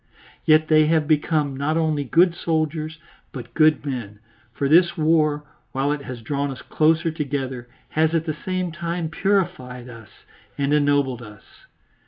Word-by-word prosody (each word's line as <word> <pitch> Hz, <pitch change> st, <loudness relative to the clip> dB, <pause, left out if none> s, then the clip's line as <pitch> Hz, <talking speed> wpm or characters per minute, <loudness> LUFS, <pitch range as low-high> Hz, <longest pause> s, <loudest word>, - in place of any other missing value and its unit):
Yet 155 Hz, 0 st, +5 dB
they 155 Hz, -1 st, +5 dB
have 155 Hz, -2 st, +2 dB
become 150 Hz, -2 st, +1 dB
not 145 Hz, +4 st, -1 dB
only 155 Hz, -3 st, 0 dB
good 170 Hz, +6 st, +3 dB
soldiers, 155 Hz, -1 st, -2 dB, 0.3 s
but 125 Hz, -3 st, -9 dB
good 155 Hz, -2 st, +3 dB
men, 120 Hz, -7 st, -5 dB, 0.3 s
for 140 Hz, +3 st, -2 dB
this 170 Hz, +5 st, +4 dB
war, 155 Hz, -2 st, +2 dB, 0.3 s
while 135 Hz, +2 st, 0 dB
it 150 Hz, -1 st, -2 dB
has 120 Hz, -3 st, -7 dB
drawn 140 Hz, +3 st, -2 dB
us 135 Hz, -, -8 dB
closer 160 Hz, +1 st, +2 dB
together, 135 Hz, -5 st, -4 dB, 0.2 s
has 160 Hz, +1 st, +1 dB
at 165 Hz, -1 st, 0 dB
the 155 Hz, -, -2 dB
same 185 Hz, -2 st, -2 dB
time 170 Hz, 0 st, -3 dB
purified 170 Hz, -10 st, -1 dB
us 115 Hz, -3 st, -12 dB, 0.5 s
and 140 Hz, +1 st, 0 dB
ennobled 145 Hz, -4 st, +2 dB
us. 105 Hz, -3 st, -12 dB
155 Hz, 155 wpm, -22 LUFS, 135-160 Hz, 0.5 s, Yet